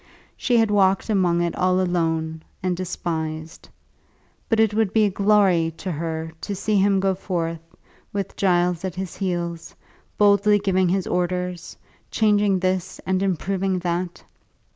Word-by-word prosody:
She 245 -2 +1
had 225 -2 +3
walked 195 +1 +2
among 175 -4 +2
it 170 - -2
all 185 0 +2
alone, 165 -3 -1 0.2
and 185 -1 0
despised. 160 -3 -5 0.8
But 225 - +2
it 220 -2 +3
would 215 -2 +1
be 220 -1 +4
a 205 - +1
glory 190 -5 +3
to 185 - -4
her 160 0 -4
to 205 - -4
see 205 +2 0
him 195 0 +3
go 190 0 +1
forth, 170 -3 -3 0.5
with 200 -2 -4
Giles 180 -2 +1
at 185 -3 -4
his 185 -2 -5
heels, 175 -3 -3 0.4
boldly 205 0 +4
giving 190 -2 +1
his 190 0 0
orders, 180 0 -2 0.3
changing 205 -3 +2
this 185 0 -1
and 190 0 0
improving 190 0 -1
that. 175 0 -3
185 Hz, 145 wpm, -23 LUFS, 175-200 Hz, 0.8 s, be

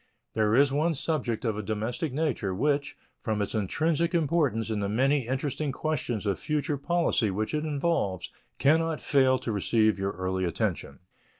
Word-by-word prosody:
There 110 0 +2
is 140 +1 +5
one 155 +4 +1
subject 130 -6 -2
of 110 -2 0
a 105 - -3
domestic 110 +8 -2
nature 130 -10 -1
which, 145 +5 0 0.2
from 110 -3 -2
its 100 - -2
intrinsic 160 - 0
importance 145 -9 +1
and 105 -2 -1
the 100 - -1
many 130 +3 +2
interesting 140 +2 -2
questions 130 -7 -2
of 100 -2 0
future 150 -2 -1
policy 170 -8 +1
which 105 +6 -2
it 150 0 0
involves, 145 - -1 0.3
can 150 +4 +4
not 165 -1 -1
fail 130 -2 +3
to 120 - -4
receive 110 0 +2
your 95 0 -1
early 95 +1 -2
attention. 80 -4 -2
130 Hz, 170 wpm, -28 LUFS, 105-150 Hz, 0.3 s, is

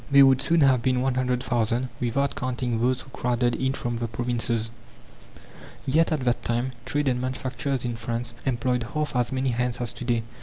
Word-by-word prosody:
They 140 -1 +8
would 135 -1 +5
soon 165 -1 +3
have 130 -3 +5
been 125 0 +1
100,000, 125 -2 0
without 135 +3 0
counting 125 -2 -2
those 125 +1 +2
who 135 - -14
crowded 120 -1 0
in 130 0 0
from 120 -2 -3
the 120 - -1
provinces. 115 -1 -1 1.1
Yet 160 +5 +3
at 155 -3 0
that 120 -1 +1
time 120 +2 0
trade 145 +2 0
and 125 -1 +1
manufacturers 130 0 -2
in 120 -1 -2
France 115 +1 -3
employed 125 -1 0
half 150 -3 -1
as 125 0 +1
many 130 0 0
hands 125 0 0
as 120 -1 0
to 120 - -7
day. 120 -2 +1
125 Hz, 185 wpm, -25 LUFS, 120-130 Hz, 1.1 s, They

